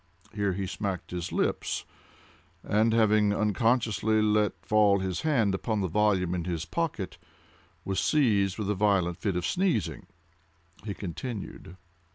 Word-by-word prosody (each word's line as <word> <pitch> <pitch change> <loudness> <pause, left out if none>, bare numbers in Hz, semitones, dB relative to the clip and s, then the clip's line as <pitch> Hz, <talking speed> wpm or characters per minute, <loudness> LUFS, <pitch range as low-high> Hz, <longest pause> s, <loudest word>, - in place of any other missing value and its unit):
Here 100 -2 0
he 95 +1 -3
smacked 95 -1 -4
his 90 -1 -4
lips, - - -1 0.8
and, 110 +2 +2
having 105 -2 +3
unconsciously 110 0 +1
let 105 -1 +2
fall 105 -2 +4
his 95 -2 -2
hand 120 -11 +2
upon 105 +2 -1
the 95 - 0
volume 95 -1 +1
in 85 -2 -2
his 85 -3 -3
pocket, 145 - -3 0.7
was 95 -1 -1
seized 105 - +2
with 105 -2 -1
a - - +2
violent 95 -4 +1
fit 100 -4 -1
of 90 -1 -1
sneezing. 105 - -1 0.8
He 100 -2 -5
continued. 95 -1 -7
100 Hz, 140 wpm, -28 LUFS, 95-110 Hz, 0.8 s, fall